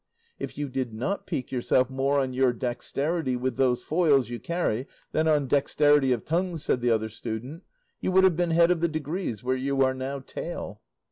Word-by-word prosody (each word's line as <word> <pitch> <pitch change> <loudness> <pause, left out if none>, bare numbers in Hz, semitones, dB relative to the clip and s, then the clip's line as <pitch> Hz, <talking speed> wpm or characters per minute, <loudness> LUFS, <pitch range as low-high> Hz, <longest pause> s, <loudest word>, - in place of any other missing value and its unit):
"If - - -6
you 145 0 -2
did 130 -4 -3
not 185 - -3
pique 125 - -3
yourself 130 0 +1
more 135 +2 +1
on 130 -1 -1
your 130 -1 +3
dexterity 135 +4 -2
with 130 +1 -2
those 125 -2 +1
foils 150 -7 +3
you 120 - -4
carry 135 -2 -1 0.2
than 155 +1 +1
on 150 -3 +3
dexterity 145 0 +3
of 120 -3 -1
tongue," 175 +2 0
said 130 -4 -1
the 120 - +2
other 110 -1 +2
student, 115 - -6 0.4
"you - - -1
would 190 +1 +5
have 185 -3 +5
been 175 +1 0
head 170 +1 +4
of 175 -2 +1
the 170 - +3
degrees, 155 - -4
where 130 +1 +1
you 135 +1 +1
are 130 0 +2
now 130 +2 -4
tail." 135 - -7
135 Hz, 200 wpm, -26 LUFS, 125-160 Hz, 0.4 s, would